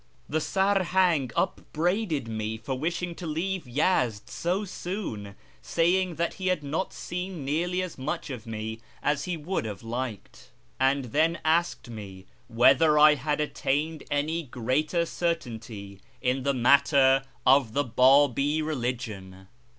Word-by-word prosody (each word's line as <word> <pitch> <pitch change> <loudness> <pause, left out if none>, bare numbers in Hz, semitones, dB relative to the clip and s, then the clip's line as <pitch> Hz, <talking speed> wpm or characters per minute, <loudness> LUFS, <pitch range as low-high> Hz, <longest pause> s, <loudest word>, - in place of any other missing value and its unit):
The 155 - 0
Sarhang 185 -7 +2
upbraided 170 - -1
me 110 0 -3
for 115 +4 -4
wishing 170 +6 -2
to 170 0 -7
leave 170 +1 -2
Yezd 125 - 0
so 185 +5 -1
soon, 175 - -5 0.3
saying 175 +1 +1
that 170 +2 -1
he 185 - -1
had 185 -5 +1
not 150 +6 -2
seen 180 -4 -5
nearly 175 +6 0
as 180 -6 -7
much 140 +1 -3
of 120 -3 -7
me 110 0 -5 0.2
as 145 0 0
he 180 -2 -2
would 175 +5 -2
have 105 -2 -6
liked, 120 -2 -6 0.3
and 135 +1 +2
then 160 +3 +3
asked 170 -1 +1
me 100 -5 -9 0.2
whether 150 +6 +5
I 150 0 +8
had 150 +1 -1
attained 150 +1 -1
any 155 +4 0
greater 150 +6 -1
certainty 115 - -4 0.2
in 130 +1 0
the 140 +1 0
matter 135 +1 +5 0.2
of 130 -4 +4
the 145 - +2
Babi 140 +4 +4
religion. 115 -10 -4
145 Hz, 135 wpm, -27 LUFS, 120-170 Hz, 0.3 s, I